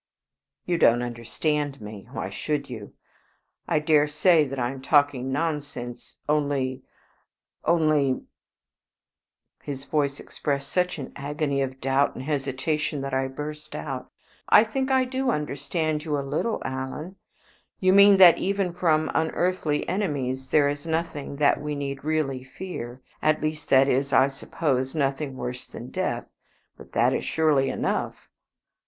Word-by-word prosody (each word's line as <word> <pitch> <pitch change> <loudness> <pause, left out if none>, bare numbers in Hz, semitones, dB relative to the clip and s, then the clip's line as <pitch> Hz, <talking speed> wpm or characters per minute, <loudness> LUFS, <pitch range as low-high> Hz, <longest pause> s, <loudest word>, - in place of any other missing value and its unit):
"You 175 -2 0
don't 120 +1 +5
understand 140 +5 -2
me. 105 -2 -9
Why 95 - -4
should 145 +5 -3
you? 110 -4 -8 0.7
I - - +2
dare 150 -1 +4
say 155 +2 +4
that 135 +1 -6
I 120 -1 0
am 135 -1 -8
talking 140 -2 +2
nonsense 145 -5 -4
only 140 -3 0 0.8
only 155 -5 +2 0.7
" - - -48
His 140 -1 -6
voice 140 -2 0
expressed 140 -1 -3
such 180 -1 0
an 135 - -7
agony 140 0 -1
of 135 0 -3
doubt 135 +2 +1
and 130 - -6
hesitation 145 +1 -1
that 135 0 -4
I 135 0 +1
burst 150 +3 -7
out 135 -4 -5 0.4
"I 210 - +8
think 265 +4 -2
that 265 - +3
I 260 - +3
do 260 0 -1
understand 150 - -1
you 150 -2 -1
a 140 - -3
little, 225 +10 -1
Alan. 130 +8 -5 0.6
You 185 0 +4
mean 200 0 +8
that 180 -3 +8
even 195 -2 0
from 160 -3 +2
unearthly 160 -1 0
enemies 135 -9 -2
there 145 0 +4
is 145 +2 -3
nothing 160 -3 -2
that 140 0 +3
we 150 0 -3
need 140 -1 -4
really 150 -4 -1
fear 130 -4 -7 0.2
at 155 0 +3
least, 155 0 -3
that 135 0 +6
is, 135 +1 +1
I 135 0 +5
suppose, 135 -1 -2
nothing 140 -1 -1
worse 125 0 -5
than - - -9
death. - - -2 0.5
But - - -15
that - - +3
is - - -1
surely 150 -4 +2
enough!" - - -2
145 Hz, 150 wpm, -25 LUFS, 135-155 Hz, 0.8 s, I